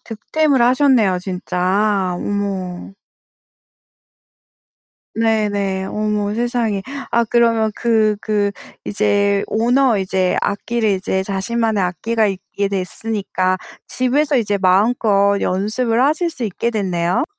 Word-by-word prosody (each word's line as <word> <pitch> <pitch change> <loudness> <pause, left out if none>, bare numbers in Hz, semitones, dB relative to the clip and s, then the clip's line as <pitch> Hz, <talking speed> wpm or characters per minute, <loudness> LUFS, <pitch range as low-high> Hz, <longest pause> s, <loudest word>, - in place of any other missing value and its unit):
득템을 270 +4 0
하셨네요. 245 -7 +3
진짜. 185 +1 -1
어머. 195 -2 -4 2.2
네네. 205 -4 0
어머 210 -1 -1
세상에. 235 -4 -1 0.3
아 235 0 +2
그러면 230 -1 +2
그 220 -3 +2
그 210 -2 0 0.3
이제 200 -1 +1
오너 240 +1 +2
이제 185 -1 0
악기를 220 +3 -1
이제 190 0 -1
자신만의 215 +2 -1
악기가 220 +5 0
있게 200 +1 -3
됐으니까 190 -1 -2 0.3
집에서 280 +3 +1
이제 205 -4 +1
마음껏 200 +1 +3
연습을 225 +5 0
하실 325 +4 +1
수 270 -7 -5
있게 220 +3 -2
됐네요. 185 -2 0
210 Hz, 230 characters per minute, -18 LUFS, 195-230 Hz, 2.2 s, 하셨네요